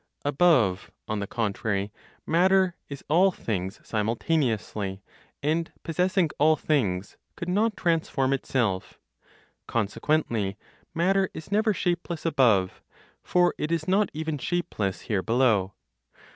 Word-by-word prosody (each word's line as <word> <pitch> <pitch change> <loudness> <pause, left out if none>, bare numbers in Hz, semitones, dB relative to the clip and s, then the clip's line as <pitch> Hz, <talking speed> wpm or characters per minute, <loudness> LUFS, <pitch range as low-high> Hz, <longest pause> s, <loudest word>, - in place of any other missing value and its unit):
Above, 135 - +3 0.2
on 110 -1 -2
the 100 - -3
contrary, 105 -2 -2 0.3
matter 185 +2 +3
is 140 -2 -8
all 180 +6 +5
things 100 - -4
simultaneously, 110 -4 -1 0.4
and 160 +3 0
possessing 180 +2 +1
all 155 +2 +5
things, 100 -13 -1 0.2
could 170 - -6
not 210 +4 +1
transform 155 -6 +1
itself. 110 -8 -1 0.7
Consequently, 110 -2 0 0.4
matter 190 +3 +2
is 160 +4 -9
never 215 +2 +3
shapeless 175 -4 -2
above; 115 - +2 0.4
for 180 0 +2
it 155 - -2
is 165 -2 -1
not 200 +3 +3
even 155 -1 -3
shapeless 110 - -2
here 100 -4 -1
below. 115 -4 +2
145 Hz, 115 wpm, -26 LUFS, 105-175 Hz, 0.7 s, all